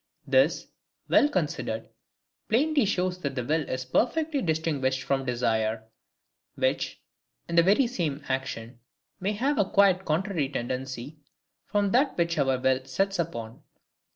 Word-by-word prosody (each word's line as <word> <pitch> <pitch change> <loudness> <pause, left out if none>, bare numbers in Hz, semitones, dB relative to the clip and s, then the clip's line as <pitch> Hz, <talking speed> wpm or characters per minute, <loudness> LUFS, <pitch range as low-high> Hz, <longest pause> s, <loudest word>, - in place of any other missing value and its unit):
This, - - +3 0.4
well 290 - +5
considered, - - -2 0.6
plainly 285 +3 +3
shows 185 -2 0
that 140 -5 -3
the 125 - -2
will 155 +3 0
is 130 0 -3
perfectly 290 - +1
distinguished 150 - 0
from 135 0 0
desire; 110 -2 0 0.7
which, - - -1 0.5
in 170 - -6
the 170 - +8
very 200 +10 +4
same 160 - -2
action, 125 -3 -4 0.4
may 195 +3 -1
have 265 +7 0
a 195 - +2
quite 195 -2 +4
contrary 165 -3 0
tendency 130 +2 -4 0.5
from 205 -2 +1
that 270 +5 +2
which 170 -2 +1
our 135 -2 +2
will 130 0 +1
sets 195 +8 -1
us 170 - +2
upon. 115 -7 -8
160 Hz, 140 wpm, -27 LUFS, 130-200 Hz, 0.7 s, the